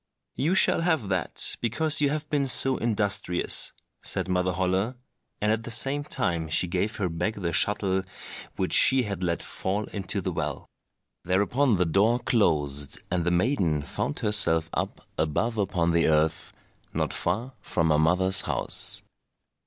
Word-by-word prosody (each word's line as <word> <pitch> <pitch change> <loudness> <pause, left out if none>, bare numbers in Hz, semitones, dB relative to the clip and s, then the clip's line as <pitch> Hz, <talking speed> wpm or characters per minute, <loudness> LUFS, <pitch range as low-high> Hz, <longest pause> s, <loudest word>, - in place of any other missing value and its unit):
"You 160 +8 0
shall 190 - +4
have 160 - 0
that 90 -4 +1
because 150 +7 +2
you 145 - +3
have 150 +1 -3
been 140 -2 0
so 130 +1 +2
industrious," 100 -5 +1 0.3
said - - 0
Mother 90 0 0
Holle, 95 +6 -1 0.4
and 105 +1 +1
at 110 +1 0
the 115 - -9
same 135 +5 +3
time 85 - -2
she 85 - +3
gave 95 +5 -2
her 100 - -2
back 85 +6 -3
the 85 -4 -4
shuttle 95 +1 +1 0.5
which - - -2
she 130 -1 +6
had 100 -4 -5
let 85 -3 -2
fall 100 +3 -3
into 100 0 -1
the 95 -1 -3
well. 75 -4 -4 0.6
Thereupon 105 +8 +1
the 90 -1 +1
door 100 +8 +2
closed, 75 - 0
and 90 -2 -1
the - - +2
maiden 90 - 0
found 70 - -4
herself 90 -7 +3
up - - -4
above 110 +9 -1
upon 85 -4 0
the 85 0 +2
earth, 80 0 0 0.4
not - - -1
far 115 +9 -2
from 80 -5 0
her 75 - +3
mother's 95 +4 +3
house. - - 0
95 Hz, 160 wpm, -26 LUFS, 85-115 Hz, 0.6 s, she